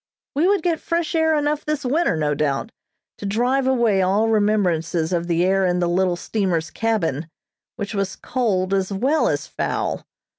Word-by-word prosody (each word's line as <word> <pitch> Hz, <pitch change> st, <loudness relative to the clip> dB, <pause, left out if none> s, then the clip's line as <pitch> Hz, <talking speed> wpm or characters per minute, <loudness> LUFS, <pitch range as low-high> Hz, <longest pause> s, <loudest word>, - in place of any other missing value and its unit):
We 300 Hz, +5 st, +2 dB
would 395 Hz, -3 st, +2 dB
get 335 Hz, -3 st, +1 dB
fresh 335 Hz, -1 st, -2 dB
air 320 Hz, -1 st, +3 dB
enough 295 Hz, 0 st, 0 dB
this 300 Hz, -2 st, -2 dB
winter, 275 Hz, -, +1 dB
no 150 Hz, -1 st, +1 dB
doubt, 145 Hz, +7 st, -1 dB, 0.5 s
to -, -, -6 dB
drive 250 Hz, +6 st, +1 dB
away 235 Hz, -7 st, +3 dB
all 200 Hz, +4 st, +2 dB
remembrances 180 Hz, -6 st, +1 dB
of 170 Hz, 0 st, -1 dB
the 170 Hz, 0 st, +2 dB
air 195 Hz, +1 st, +2 dB
in 180 Hz, -1 st, +1 dB
the 175 Hz, -1 st, +1 dB
little 180 Hz, +1 st, +1 dB
steamer's 175 Hz, -4 st, -1 dB
cabin, 170 Hz, -9 st, -1 dB, 0.5 s
which 205 Hz, +2 st, -5 dB
was 195 Hz, -2 st, -2 dB
cold 195 Hz, -7 st, -1 dB
as 195 Hz, 0 st, 0 dB
well 265 Hz, +11 st, +1 dB
as -, -, -1 dB
foul. -, -, -3 dB
200 Hz, 175 wpm, -22 LUFS, 175-265 Hz, 0.5 s, air